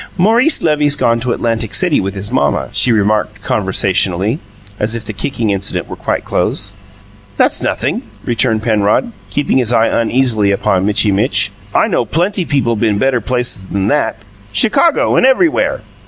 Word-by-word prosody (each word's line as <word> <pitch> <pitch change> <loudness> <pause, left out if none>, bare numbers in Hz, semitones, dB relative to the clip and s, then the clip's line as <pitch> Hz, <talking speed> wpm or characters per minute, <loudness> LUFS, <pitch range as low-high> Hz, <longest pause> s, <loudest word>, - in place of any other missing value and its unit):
"Maurice 230 - +3
Levy's 150 -2 +2
gone 115 -5 +1
to 125 +1 -2
Atlantic 115 -2 -1
City 180 -5 +3
with 95 +1 -4
his 100 +1 -7
mamma," 70 -2 0
she 125 - +1
remarked 105 -1 0
conversationally, 95 - 0 0.4
as 110 +2 +2
if 115 -2 -6
the 110 - -5
kicking 115 -1 -2
incident 95 -1 -3
were - - -7
quite - - -3
closed. 100 - -1 0.7
"That's - - +3
nothin'," - - -1 0.2
returned 115 -2 0
Penrod, 110 - +1 0.2
keeping 145 -2 0
his 120 -2 0
eye 115 -1 +3
uneasily 115 -3 +1
upon 95 -1 0
Mitchy 105 0 +2
Mitch. 105 +6 0 0.2
"I - - +4
know - - 0
plenty 175 - -1
people 125 -6 0
been 110 -1 0
better 130 +1 +1
places 120 -5 0
than 100 +1 -1
that 150 - 0 0.4
Chicago 275 - +2
and - - +3
everywhere." 285 +6 +2
115 Hz, 160 wpm, -14 LUFS, 105-140 Hz, 0.7 s, I